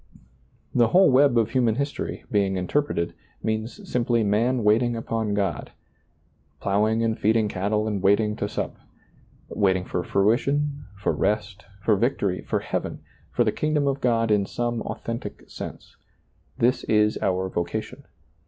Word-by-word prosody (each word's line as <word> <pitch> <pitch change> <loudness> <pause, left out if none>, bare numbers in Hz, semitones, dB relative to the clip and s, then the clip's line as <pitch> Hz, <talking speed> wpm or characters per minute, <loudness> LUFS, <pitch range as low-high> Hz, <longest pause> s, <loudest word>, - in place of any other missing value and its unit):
The 120 -2 +4
whole 185 +6 +5
web 135 -1 +5
of 115 -1 +2
human 120 -3 +2
history, 140 +2 -3
being 100 -2 +1
interpreted, 90 -2 -1 0.3
means 110 - -3
simply 120 -4 +1
man 115 +4 +1
waiting 115 +3 +3
upon 115 -2 -2
God, 95 -5 -2 0.4
" - - -40
plowing 110 +3 +1
and 110 -1 0
feeding 110 0 +3
cattle 105 +2 -1
and 105 -3 -2
waiting 105 +2 +3
to 100 - -2
sup - - -4 0.4
"; - - -32
waiting 95 -2 +1
for 90 - -2
fruition, 140 - +1
for 95 - 0
rest, 105 -1 -1 0.2
for 110 - +4
victory, 100 -4 0
for - - -2
heaven, - - -3 0.3
for - - +2
the - - +1
kingdom 150 -1 0
of 140 0 0
God 115 -2 +2
in 100 -2 +2
some 120 -1 -2
authentic 115 -3 -6
sense. - - -9 0.6
This 125 +2 +2
is 105 0 +2
our 95 0 0
vocation. 85 -2 -4
110 Hz, 150 wpm, -25 LUFS, 100-120 Hz, 0.6 s, whole